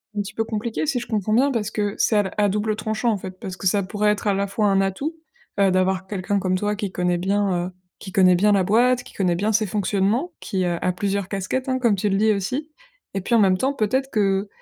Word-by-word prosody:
un 205 - 0
petit 200 - -7
peu 225 - 0
compliqué, 225 +5 -3
si 275 -5 0
je 240 - -8
comprends 215 -1 -1
bien, 270 +5 +4
parce 215 -4 -2
que 205 -1 -2
c'est 220 - +2
à 195 -2 +1
à 205 -1 +3
double 210 +2 -1
tranchant, 220 +2 -1
en 210 - 0
fait, 185 0 -9
parce 185 -1 -7
que - - -8
ça 200 +2 +3
pourrait 210 +2 +1
être, 210 0 -3
à 200 - +2
la 200 0 0
fois, 205 +1 0
un 195 0 +3
atout, 275 - -2 0.4
heu, 195 -1 +4
d'avoir 185 0 +1
quelqu'un 200 +1 -2
comme 185 -1 0
toi 210 0 -1
qui 205 -3 -4
connaît 180 -1 0
bien, 190 -1 0
heu, - - -16 0.3
qui 190 - -9
connaît 185 -2 +5
bien 205 +4 +3
la 195 -2 +3
boîte, 245 +5 +3
qui - - -15
connaît 180 -3 +1
bien 210 +5 0
ses 215 0 +2
fonctionnements, 205 - 0
qui, 190 -4 -2
heu, 175 -1 0
a 180 - +1
plusieurs 195 +1 -2
casquettes, 210 +7 -3
hein, 260 0 0
comme 235 -5 +3
tu 200 +2 -1
le 195 - +1
dis 215 +1 +3
aussi. 255 +11 -3 0.5
Et 195 - -1
puis, 235 - -3
en 230 - +6
même 190 -2 +4
temps, 270 +5 0
peut-être 265 +3 -1
que, 200 -1 +1
205 Hz, 265 wpm, -22 LUFS, 190-220 Hz, 0.5 s, en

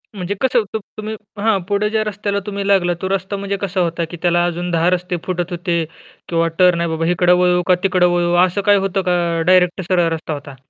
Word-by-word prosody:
म्हणजे 195 +1 -3
कसं? 250 -3 +2
त - - 0 0.2
तुम्ही 215 +1 -5 0.3
हां. 215 -2 +3
पुढे 205 +1 +1
ज्या 220 0 0
रस्त्याला 205 -1 -2
तुम्ही 200 -1 -4
लागला 185 -3 +3
तो 190 - -2
रस्ता 195 +1 -2
म्हणजे 200 0 -3
कसा 195 -1 -2
होता? 170 -1 -1
की 175 - -7
त्याला 175 -1 +2
अजून 175 +1 -3
10 170 +1 +2
रस्ते 180 0 -1
फुटत 180 -1 -3
होते? 175 -1 -1 0.5
किंवा 165 -1 +1
टर्न 180 -2 +5
आहे 170 - -1
बाबा 160 0 -2
इकडे 180 0 +2
वळू 180 0 +3
का 180 - +5
तिकडं 185 -2 +3
वळू? 175 0 +1
असं 185 +2 -2
काही 205 +1 +4
होतं 195 0 -1
का 180 - +2 0.3
डायरेक्टच 185 0 +3
सरळ 175 -2 +3
रस्ता 160 -1 -4
होता? 140 -2 -8
180 Hz, 220 wpm, -18 LUFS, 175-200 Hz, 0.5 s, टर्न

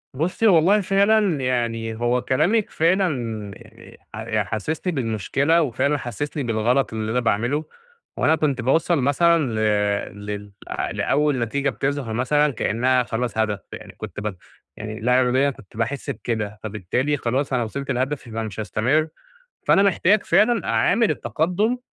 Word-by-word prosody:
بُصي، 180 - +1
والله 190 +3 +5
فعلًا 195 -4 +2
يعني 115 -3 -1
هو 120 +2 0
كلامِك 195 - +1
فعلًا 185 +3 +2 0.5
يعني 115 0 -16 0.2
ح - - -6
ي 110 -2 +1
حسسني 150 - -3
بالمشكلة 135 - +1
وفعلًا 140 +1 0
حسسني 140 +4 -4
بالغلط 120 +3 +1
اللي 110 0 -3
أنا 125 - +1
باعمله، 120 +6 0 0.5
وأنا 160 - +3
كنت 140 -5 0
باوصّل 160 +6 +2
مثلًا 170 +6 +3 0.8
ل 105 - -9
لل 105 0 -6 0.4
لأول 145 -3 +1
نتيجة 140 +5 0
بتظهر 135 -3 -2
مثلًا 145 +5 +2
كأنها 125 +3 +1
خلاص 120 0 -3
هدف، 105 -2 0
يعني - - -9
كنت - - -7
بت 105 -2 -4 0.4
يعني 110 0 -6
لا 125 +3 +3
إراديًا 130 +3 +2
كنت 110 -6 -12
باحس 120 +4 -2
بكده، 105 -3 -3
فبالتالي 110 +8 -1
خلاص 130 +2 -1
أنا 125 -2 +1
وصلت 140 +5 -4
لهدفي 130 +1 -2
يبقى 115 0 -3
مش 105 -1 -7
هاستمر، 125 +9 +1 0.6
فأنا 195 - +5
محتاج 200 +1 +3
فعلًا 225 -2 +3
أعامل 200 - +2
التقدم 175 - 0
130 Hz, 145 wpm, -22 LUFS, 115-155 Hz, 0.8 s, والله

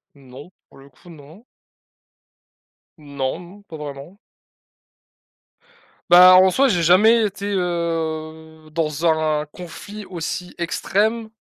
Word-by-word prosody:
Non, 135 +3 -14 0.2
pour - - -20
le 135 +1 -16
coup, 140 +6 -22
non. 160 +7 -16 1.5
Non 140 -3 -5 0.2
m - - -21
pas 165 - -11
vraiment. 150 +5 -10 1.9
Bah 180 +1 +8
en 185 +1 +6
soi, 270 +8 +2
j'ai 180 -9 0
jamais 215 +7 +4
été, 200 0 -7
heu, 160 -3 -4
dans 155 0 -2
un 155 -2 0
conflit 200 +7 -11
aussi 180 0 -6
extrême 220 +6 -2
165 Hz, 110 wpm, -20 LUFS, 155-185 Hz, 1.9 s, Bah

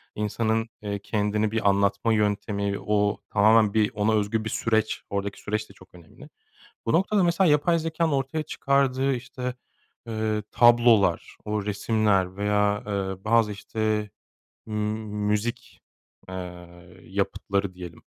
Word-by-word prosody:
insanın, 110 +2 -1
eee, 100 -1 -3
kendini 105 +1 -1
bir 110 -2 +2
anlatma 100 +3 +2
yöntemi, 100 -1 0
o 105 -1 0
tamamen 110 0 +4
bir 110 -1 +2
ona 105 +1 +1
özgü 110 +1 0
bir 110 - -2
süreç 110 -1 0
oradaki 100 0 -3
süreçte 105 -1 -3
çok 95 -2 -19
önemli. 85 -2 -15 0.6
Bu 115 - 0
noktada 190 +3 +3
mesela 170 0 +3
yapay 165 +3 +3
zekânın 165 0 -1
ortaya 140 +3 -1
çıkardığı 135 -2 +1
işte, 125 0 -5 0.5
eee, 110 -1 -1
tablolar, 120 -6 +4
o 105 -1 -2
resimler 105 -2 +1
veya, 105 0 +1
eee, 95 -1 -3
bazı 115 -1 +3
işte 110 0 -2 0.6
m 110 - -6 0.5
müzik, 105 +3 -2 0.5
eee, 90 -1 -9
yapıtları 100 +1 -2
diyelim. 90 -3 -10
105 Hz, 125 wpm, -25 LUFS, 100-115 Hz, 0.6 s, tamamen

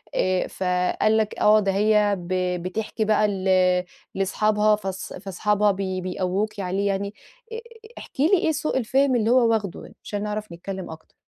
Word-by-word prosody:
آآ 185 0 +1
فقال 180 +4 0
لكِ 215 -1 -1
آه 215 +1 +5
ده 195 -2 0
هي 210 0 +3
ب 175 +1 -5 0.3
بتحكي 215 +4 -3
بقى 215 0 +3
ل 195 -2 -4 0.7
لصحابها 210 +2 +2
فاص 195 -2 -6
فاصحابها 205 +2 0
بي 190 -1 -3
بيقووكِ 190 +3 -2
عليه 195 +2 -1
يعني، 200 +1 -2 0.4
أ 450 - -4 0.4
احكِ - - -12
لي 340 +8 +4
إيه 320 - +1
سوء 295 -2 -1
الفهم 260 +2 +2
اللي 225 -1 +1
هو 245 -2 +4
واخده 205 -5 -2
يعني - - -14
عشان 205 0 -4
نعرف 210 -2 -4
نتكلم 190 +2 -7
أكتر؟ 160 0 -13
205 Hz, 165 wpm, -23 LUFS, 190-215 Hz, 0.7 s, آه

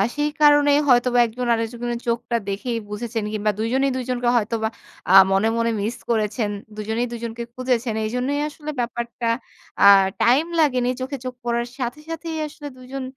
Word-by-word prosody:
সেই 295 0 0
কারণেই 290 -1 +6
হয়তোবা 245 -1 +4
একজন 245 +2 -4
আরেকজনের 235 +1 -3
চোখটা 235 0 0
দেখেই 230 +4 -2
বুঝেছেন 225 +1 -4
কিংবা 210 0 +1
২ 220 - 0
জনেই 270 +1 +2
২ 260 - -2
জনকে 245 -1 0
হয়তোবা 220 0 -1 0.4
আ - - +5 0.2
মনে, 195 +3 +3
মনে 230 0 +1
মিস 225 +4 -2
করেছেন। 215 -1 0 0.3
২ 215 - -5
জনেই 235 +2 0
২ - - -4
জনকে 235 0 -4
খুঁজেছেন। 250 -3 -1
এজন্যই 250 +6 -1
আসলে 300 0 -9
ব্যাপারটা 235 0 -3 0.6
আ - - +10 0.4
টাইম 255 +7 +4
লাগেনি। 255 -5 +2
চোখে 270 +2 -3
চোখ 255 - -3
পড়ার 235 0 -1
সাথে 245 +3 -3
সাথেই 330 0 -5
আসলে 295 0 -9
২ 255 - -14
জন 270 - -3
240 Hz, 175 wpm, -22 LUFS, 230-260 Hz, 0.6 s, আ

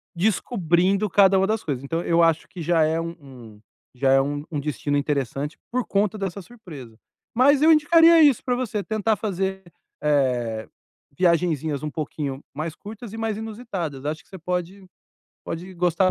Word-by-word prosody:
descobrindo 190 0 +1
cada 195 0 +5
uma 190 - +3
das 220 0 -1
coisas. 140 -5 -3
Então 165 +4 -2
eu 170 0 +2
acho 165 -1 +2
que 175 - -9
já 165 0 +2
é 160 +1 +1
u 165 0 -4
um 120 -7 -14 0.3
já 135 +1 +1
é 135 0 +5
um 145 +1 -3 0.2
destino 145 0 -2
interessante 140 0 -2
por 250 0 -1
conta 205 +1 0
dessa 195 0 -4
surpresa. 155 - -12 0.4
Mas 275 +4 +4
eu 325 - +7
indicaria 325 +2 +6
isso 280 -6 +4
pra 250 -1 0
você, 220 -5 -2
tentar 220 0 0
fazer, 190 -1 -3 0.4
eh, 125 -7 0 0.5
viagenzinhas 160 -5 +1
um 150 - -2
pouquinho 145 -2 -5
mais 155 +2 -4
curtas 215 +1 -10
e - - -6
mais 220 -2 -2
inusitadas. 200 - -5
Acho 155 +2 -3
que - - -31
você 190 - -9
pode 180 +3 -4 0.6
pode 180 +3 -6
gostar 180 +1 +2
175 Hz, 170 wpm, -23 LUFS, 145-210 Hz, 0.6 s, eu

